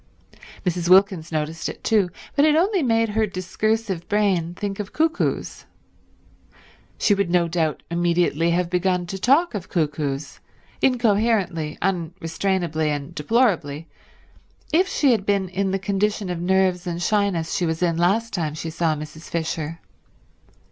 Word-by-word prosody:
Mrs. 175 -1 -1
Wilkins 190 -3 +4
noticed 155 +1 -2
it - - -9
too, 205 -5 +2 0.3
but 285 - +4
it 305 0 +5
only 375 +3 +2
made 225 -4 +2
her 215 +1 +1
discursive 195 0 -2
brain 190 -5 +1
think 200 0 -4
of 205 -1 -5
cuckoos. 320 +1 -1 1.3
She 205 - +3
would 200 -3 0
no 175 -1 +3
doubt 165 -2 -1
immediately 170 -1 +1
have 175 +1 +1
begun 180 0 0
to 190 +2 -6
talk 285 - +3
of 200 -4 -5
cuckoos, 145 -3 -2 0.4
incoherently, 210 - +1
unrestrainably 170 -2 -1
and 145 -2 -3
deplorably, 165 - +1 0.9
if 365 +4 +4
she 290 -8 +2
had 220 -5 +1
been 200 -1 +1
in 195 +1 -1
the 195 - 0
condition 200 0 -1
of 170 -1 -4
nerves 185 0 +1
and 170 -1 -3
shyness 185 -3 0
she 180 -4 0
was 160 +2 -1
in 170 -2 +2
last 200 +7 +1
time 160 -5 -2
she 160 +1 -5
saw 165 -1 0
Mrs. 155 +2 -9
Fisher. 160 -1 -3
180 Hz, 145 wpm, -23 LUFS, 165-210 Hz, 1.3 s, it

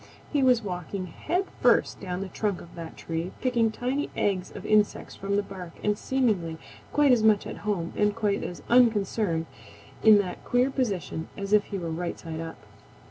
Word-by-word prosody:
He 290 - +3
was 250 -3 +4
walking 185 0 -4
head 345 - -2 0.2
first - - +3
down 180 0 -4
the 195 - -3
trunk 200 +1 -2
of 170 - -13
that 165 -2 -8
tree, 165 +2 -4
picking 240 -3 +2
tiny 255 +6 -2
eggs 190 -3 0
of - - -9
insects 210 -1 +2
from 200 +1 -2
the 205 - +2
bark 180 -4 -9
and 210 0 +2
seemingly 205 -11 0 0.3
quite 295 -2 +4
as 245 -3 +5
much 215 -2 +4
at - - -6
home 195 -5 -2
and 210 0 +2
quite 210 -3 0
as 175 - -6
unconcerned 210 -7 +3 0.6
in 220 -1 +8
that 185 -3 -2
queer 250 +2 +2
position 195 - -2
as 200 +1 -3
if 210 -1 +5
he 200 - -4
were 170 -3 -4
right 170 +1 -3
side 160 -1 -6
up. 165 0 -6
205 Hz, 190 wpm, -27 LUFS, 180-230 Hz, 0.6 s, in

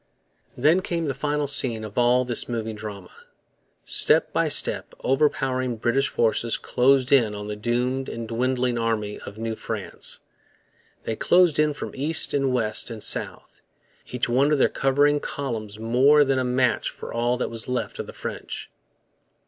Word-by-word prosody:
Then 155 +8 +4
came 170 -3 -2
the 140 - -1
final 145 +2 -1
scene 130 -5 +1
of 105 -2 -8
all 125 +1 +3
this 120 -1 0
moving 110 -2 -3
drama. 105 -4 -8 0.7
Step - - +2
by - - +2
step - - +1
overpowering 130 -3 +1
British 120 +5 +1
forces 115 0 0
closed 130 +1 +2
in 115 -7 +4
on 105 0 -6
the 105 - -4
doomed 125 +4 -1
and 115 -1 -6
dwindling 125 +1 0
army 110 -2 -2
of 100 - -10
New 115 0 -3
France. - - -6 0.8
They 110 - -3
closed 175 +3 +3
in 150 -1 +3
from - - -6
east 150 +4 0
and 135 -2 +1
west 115 -3 +1
and 115 -2 -7
south, - - -2 0.5
each 125 -1 -1
one 135 +5 +2
of 150 - +3
their - - +3
converging 145 +2 +2
columns 115 -8 -5
more 130 +7 +4
than 135 -1 +1
a - - 0
match 125 -1 +1
for - - -9
all 120 +1 0
that 125 - -3
was 115 -1 -4
left 125 0 -3
of - - -4
the - - -9
French. - - -7
125 Hz, 165 wpm, -24 LUFS, 115-135 Hz, 0.8 s, Then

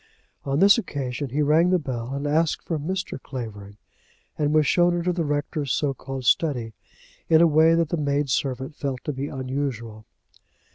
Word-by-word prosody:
On 135 0 0
this 200 +7 +6
occasion 140 - -4
he 145 +4 0
rang 160 +4 +4
the 185 - +4
bell, 125 -6 -5
and 140 +1 -4
asked 155 +2 +1
for 165 -3 -2
Mr. 185 -2 -4
Clavering, 105 -6 -8 0.6
and 150 -1 0
was 155 -1 +4
shown 175 +3 +3
into 175 +1 0
the 170 -1 -1
rector's 145 -1 -2
so 145 -2 0
called 135 -1 -7
study, 120 -5 +1 0.6
in 160 - +6
a 170 - +7
way 160 +1 +5
that 165 -2 +1
the 170 - -1
maid 145 -1 0
servant 130 +1 -2
felt 135 -4 -4
to 150 - -3
be 135 +2 -4
unusual. 130 -5 -4
145 Hz, 180 wpm, -24 LUFS, 130-160 Hz, 0.6 s, a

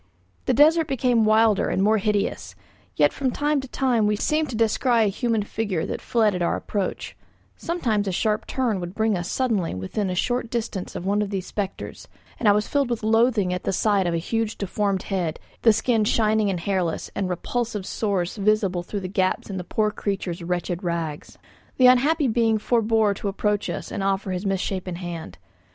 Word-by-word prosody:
The - - +2
desert 315 +2 +5
became 245 -4 +2
wider 215 -1 +4
and 190 - +1
more 215 +1 +3
hideous; 205 0 -1 0.4
yet - - +3
from 270 -2 -1
time 290 +2 0
to 265 - -9
time 245 -5 +1
we 210 - +2
seemed 305 +7 0
to 240 - -4
descry 230 +1 +2
a - - +3
human 225 +1 0
figure 205 -5 -2
that - - -4
fled 220 -3 +2
at 180 - -3
our 170 - +1
approach, 200 -3 -3 0.4
sometimes 230 - -1
a - - 0
sharp 210 +4 0
turn 240 -7 0
would 175 +1 -6
bring 220 -1 +1
us 175 -1 -3
suddenly 220 - 0
within 140 - -3
a 180 - -2
short 245 +5 -1
distance 220 -6 -4
of 175 - -5
one 205 +2 +1
of 205 - -2
these 195 -2 -3
spectres, 200 -3 -5 0.3
and 220 - +3
I - - +8
was 210 +1 +1
filled 280 -3 +1
with 235 -2 -2
loathing 220 -4 +3
at 180 - -3
the - - 0
sight 195 -1 +2
of 170 - 0
a - - +1
huge 225 +6 -2
deformed 200 -1 -1
head, 175 -5 -2 0.2
the 225 - +6
skin 225 +1 +1
shining 215 -1 +2
and 180 -3 -2
hairless, 180 -3 -1
and 195 -2 -2
repulsive 210 +3 -3
sores 195 -3 -2
visible 200 -3 +1
through 200 +3 -5
the 185 - -4
gaps 185 +1 -1
in 190 - -4
the 180 - -4
poor 215 +4 0
creature's 190 -4 -3
wretched 175 +1 -3
rags. 165 -4 -4 0.4
The 255 - +5
unhappy 275 +4 +5
being 225 -1 +2
forbore 220 -1 +2
to - - -4
approach 205 +1 -1
us - - -5
and - - -3
offer 195 0 0
his 185 +2 -2
misshapen 190 -1 -2
hand. 170 - -7
210 Hz, 200 wpm, -24 LUFS, 185-230 Hz, 0.4 s, I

